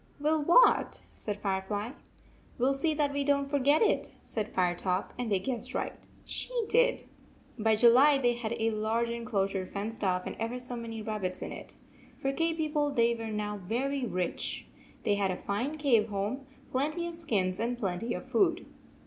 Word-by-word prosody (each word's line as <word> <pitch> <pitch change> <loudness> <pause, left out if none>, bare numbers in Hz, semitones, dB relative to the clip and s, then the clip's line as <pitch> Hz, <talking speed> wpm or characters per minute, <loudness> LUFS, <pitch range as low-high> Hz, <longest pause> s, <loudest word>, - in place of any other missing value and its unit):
"Will 305 +1 +2
what?" 350 +11 +5
said 210 -1 -4
Firefly. 205 +3 -2 0.6
"Will 260 +3 +1
see 305 +3 +1
that 290 -2 +1
we 285 0 0
don 280 0 +2
t 275 - -9
forget 285 - +4
it," 435 - +1
said 215 -1 -2
Firetop, 180 +1 0
and 240 -3 -2
they 200 - +4
guessed 240 +5 -4
right. - - -4 0.2
She - - -3 0.2
did. - - +3 0.6
By 220 0 +3
July 250 +6 +6
they 245 -3 +2
had 235 -1 -3
a 225 0 +1
large 225 +2 0
enclosure 200 -5 -1
fenced 210 +3 -5
off 180 -1 +1
and - - -5
ever 230 +2 -2
so 250 0 -5
many 225 -2 -5
rabbits 210 -4 -3
in - - -5
it. - - -9 0.4
For 270 0 -1
cave 330 +2 0
people 300 -2 +1
they 235 -4 +3
were 230 -1 -5
now 210 -1 -3
very 255 +8 -2
rich. 180 -4 -2 0.4
They 205 - +2
had 200 -1 +1
a 180 - -2
fine 245 +10 -2
cave 235 -7 +3
home, 210 +7 -3 0.2
plenty 305 +6 0
of 340 - -4
skins, 200 - 0
and 240 +2 -1
plenty 215 +2 -2
of - - -6
food. 360 -3 +2
235 Hz, 180 wpm, -30 LUFS, 205-280 Hz, 0.6 s, July